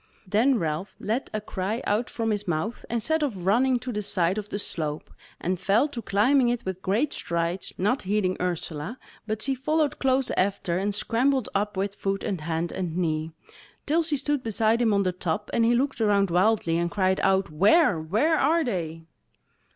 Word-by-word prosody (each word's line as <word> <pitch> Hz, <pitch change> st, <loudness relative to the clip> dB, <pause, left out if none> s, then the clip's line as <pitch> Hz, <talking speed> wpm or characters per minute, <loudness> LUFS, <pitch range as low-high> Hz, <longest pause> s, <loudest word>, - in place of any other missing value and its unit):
Then 235 Hz, +7 st, +3 dB
Ralph 165 Hz, +1 st, -3 dB
let 230 Hz, +6 st, -2 dB
a 215 Hz, -, -2 dB
cry 210 Hz, +3 st, -3 dB
out 215 Hz, +4 st, 0 dB
from 225 Hz, -1 st, -2 dB
his 205 Hz, -1 st, -2 dB
mouth, 175 Hz, +8 st, -2 dB
and 235 Hz, -1 st, -1 dB
set 315 Hz, +4 st, +1 dB
off 285 Hz, -5 st, 0 dB
running 235 Hz, +8 st, +2 dB
to 250 Hz, +1 st, -5 dB
the 210 Hz, -, -2 dB
side 190 Hz, -1 st, +1 dB
of 210 Hz, 0 st, -8 dB
the -, -, -3 dB
slope, 155 Hz, -6 st, -3 dB, 0.3 s
and 180 Hz, 0 st, -2 dB
fell 200 Hz, +9 st, +3 dB
to 245 Hz, -5 st, -6 dB
climbing 240 Hz, +6 st, +3 dB
it 240 Hz, 0 st, -2 dB
with 190 Hz, -1 st, -4 dB
great 225 Hz, +11 st, 0 dB
strides, 170 Hz, +2 st, -2 dB
not 210 Hz, +8 st, +1 dB
heeding 190 Hz, -1 st, 0 dB
Ursula; 175 Hz, +3 st, -3 dB, 0.3 s
but 215 Hz, 0 st, -2 dB
she 270 Hz, -, 0 dB
followed 300 Hz, +3 st, 0 dB
close 265 Hz, -1 st, +1 dB
after, 185 Hz, -2 st, 0 dB
and 200 Hz, +1 st, -1 dB
scrambled 255 Hz, +4 st, +1 dB
up 205 Hz, 0 st, -1 dB
with 195 Hz, +1 st, -1 dB
foot 195 Hz, -1 st, -2 dB
and 195 Hz, -7 st, -2 dB
hand 165 Hz, +2 st, -2 dB
and 175 Hz, -3 st, -3 dB
knee, 160 Hz, -2 st, -1 dB, 0.5 s
till 320 Hz, +3 st, +2 dB
she 310 Hz, -3 st, -1 dB
stood 285 Hz, 0 st, -1 dB
beside 225 Hz, 0 st, +1 dB
him 230 Hz, -2 st, +3 dB
on 200 Hz, -1 st, +3 dB
the 185 Hz, -, +1 dB
top, 180 Hz, +3 st, -3 dB
and 230 Hz, -, +3 dB
he 240 Hz, +1 st, +4 dB
looked 265 Hz, 0 st, 0 dB
around 200 Hz, -3 st, +3 dB
wildly 180 Hz, -2 st, +2 dB
and 170 Hz, 0 st, 0 dB
cried 190 Hz, 0 st, +1 dB
out: 190 Hz, -3 st, +2 dB
"Where! 200 Hz, -, +4 dB
where 255 Hz, -, +1 dB
are 325 Hz, +4 st, +3 dB
they?" 165 Hz, -, -3 dB
205 Hz, 195 wpm, -26 LUFS, 185-245 Hz, 0.5 s, he